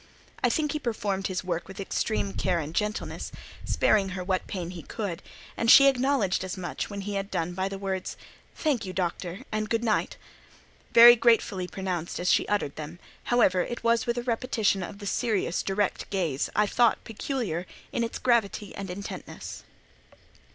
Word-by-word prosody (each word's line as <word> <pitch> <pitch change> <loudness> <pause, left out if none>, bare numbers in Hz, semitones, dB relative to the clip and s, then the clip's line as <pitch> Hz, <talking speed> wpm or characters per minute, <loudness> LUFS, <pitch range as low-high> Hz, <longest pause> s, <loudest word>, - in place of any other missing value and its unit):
I - - +5
think 300 -3 0
he 305 - -2
performed 205 -6 -2
his 185 -1 -3
work 175 -2 -3
with 195 - -10
extreme 105 - -1
care 105 - 0
and 155 -1 -4
gentleness, 210 +3 -2 0.3
sparing 200 -3 +3
her 180 - -3
what 185 0 -1
pain 180 -3 -4
he 175 -2 -7
could; 195 -1 -5 0.3
and 230 - 0
she 275 - +10
acknowledged 260 -8 +2
as 185 +1 -5
much, 180 -2 -4
when 200 -1 -5
he 205 +1 -4
had 195 0 -2
done, 170 -1 -2
by 190 +2 -1
the 195 - -5
words:—"Thank 195 - -4
you, 185 -2 -5
Doctor, 180 +2 -3
and 215 0 -2
good 230 0 0
night," 220 -3 0 0.7
very 240 +1 +10
gratefully 225 -6 +2
pronounced 180 -3 -4
as 180 +1 +2
she - - +3
uttered 205 -9 -1
them, 155 +2 -7 0.3
however, 190 -7 +3
it 240 +6 -4
was 230 -1 +2
with 235 0 0
a 240 - -1
repetition 230 -4 +1
of 185 +3 -6
the 205 - -9
serious, 200 -4 0
direct 195 0 -1
gaze, 170 -9 -1
I 210 - +4
thought, 235 +2 +2
peculiar 220 - -3 0.2
in 235 - 0
its 230 - -3
gravity 220 -4 +1
and 195 -1 -6
intentness. 200 +3 -7
200 Hz, 175 wpm, -27 LUFS, 180-230 Hz, 0.7 s, she